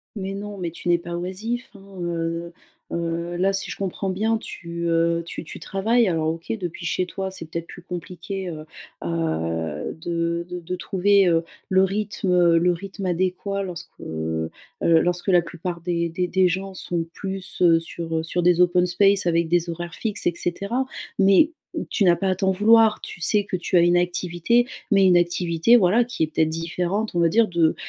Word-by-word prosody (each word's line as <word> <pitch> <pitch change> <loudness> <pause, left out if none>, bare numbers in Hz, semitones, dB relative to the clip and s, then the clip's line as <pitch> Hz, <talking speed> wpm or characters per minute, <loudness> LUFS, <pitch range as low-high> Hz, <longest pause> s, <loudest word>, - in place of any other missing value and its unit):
Mais 195 -1 -4
non 205 0 -6
mais 175 -3 -3
tu 175 - -5
n'es 175 - +5
pas 170 0 -6
oisif, 210 +8 -4
hein, 195 - -13 0.2
heu 170 0 -3 0.4
heu, 170 +1 -2
là, 190 +2 +2
si 195 0 -3
je - - -4
comprends 195 0 -3
bien, 220 +4 +1
tu, 170 -5 -6
heu, 170 0 +2
tu 170 - -6
tu - - -9
travailles 225 +4 +1
alors, 160 -2 +1
OK, 165 +1 -5
depuis 175 -2 -6
chez 180 - 0
toi, 190 +2 -4
c'est 190 - -8
peut-être 170 +1 -5
plus 180 - -11
compliqué, 180 +2 -6
heu 155 -2 -6 0.4
heu, 80 - -2
de 170 0 -2
de 180 0 -5
de 180 +2 -4
trouver, 195 +1 +3
heu, 165 -1 +3 0.3
le 190 0 +4
rythme, 200 -1 -1
heu, 170 -2 +5
le 175 +2 +3
rythme 195 +2 -6
adéquat 185 +3 -1
lorsque, 180 -3 -7
heu 80 0 -3 0.3
heu, 165 -1 +5
lorsque 175 +2 -1
la 180 -2 +5
plupart 170 0 -6
des 170 -1 -1
des 180 +2 -1
des 185 +1 +3
gens 190 +2 -2
sont 175 -2 -2
plus, 190 -2 -6
heu, 165 -2 +6
sur 165 -1 -4
sur 175 +2 -1
des 175 0 +4
open 180 0 +4
spaces 195 +2 +3
avec 170 -1 +2
des 175 0 +2
horaires 170 +1 -5
fixes 215 -2 -3
et 175 - +2
cetera 200 +9 -1 0.3
mais 195 - +5 0.4
tu 200 - +2
n'as 175 -1 +6
pas 195 +1 -1
à 185 - +1
t'en 190 +1 +1
vouloir. 220 +2 +5
Tu 180 - -9
sais 205 +4 +2
que 195 - -4
tu 180 +1 -2
as - - +6
une 175 +1 +4
activité 180 +6 +1 0.2
mais 195 -3 +5
une 180 -1 +6
activité, 175 +4 +3
voilà, 210 +4 +4
qui 240 -9 -2
est, - - +1
peut-être, 160 0 +1
différente, 175 +6 -2
on 175 - 0
va 170 - +5
dire, 225 +4 +4
de, 170 -3 +2
175 Hz, 200 wpm, -23 LUFS, 170-195 Hz, 0.4 s, heu